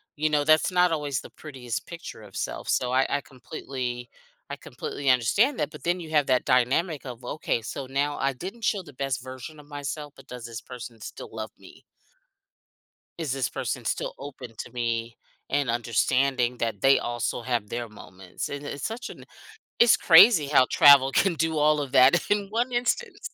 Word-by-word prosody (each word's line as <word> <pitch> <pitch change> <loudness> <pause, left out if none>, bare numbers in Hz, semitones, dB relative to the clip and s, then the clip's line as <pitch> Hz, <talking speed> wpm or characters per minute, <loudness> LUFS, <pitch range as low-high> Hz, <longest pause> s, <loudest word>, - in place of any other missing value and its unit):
you 155 +1 0
know, 150 -1 +2
that's 155 +4 +4
not 180 -1 +3
always 145 -4 -1
the - - -12
prettiest 130 -6 -6
picture 170 -9 -9
of 100 -2 -14
self. - - -4
So 125 -1 +1
I 130 +1 +4
I 145 - -6
completely 125 -1 -6 0.4
I - - -4
completely 140 -1 -5
understand 200 - +3
that, 150 0 -1
but - - -12
then 175 +1 0
you 165 - -8
have 150 -3 +2
that 130 -1 +2
dynamic 135 +6 +1
of, 125 -1 -8
"Okay, 125 -3 -2
so 130 +4 -6
now 140 +2 -1
I 135 - +1
didn't 185 - -8
show 200 -1 +1
the 150 -5 -14
best 135 0 -2
version 130 +4 -9
of 145 - -14
myself, 145 0 -6
but - - -16
does 125 -2 -8
this 115 -1 -7
person 120 -2 -10
still - - -8
love - - -5
me?" - - -16 1.4
"Is 155 -6 -2
this 135 -3 -1
person - - -4
still - - -2
open 130 -4 -9
to - - -7
me," 115 -1 -3 0.3
and 140 -4 +1
understanding 125 +2 +1
that 115 -4 -2
they 135 0 +5
also 120 0 -3
have 120 -3 -2
their 120 -1 -4
moments? 95 -3 -8
And 140 0 -6
it's 145 -1 -5
such 230 +2 -5
an - - -11 0.5
it's 235 -1 +6
crazy 165 -2 +7
how 140 -3 +5
travel 135 0 +7
can 190 +4 +2
do 160 0 0
all 150 0 +4
of 140 -3 -4
that 135 +5 +5
in 205 -1 +1
one 240 +4 -1
instance. 245 - -2
135 Hz, 190 wpm, -26 LUFS, 125-155 Hz, 1.4 s, crazy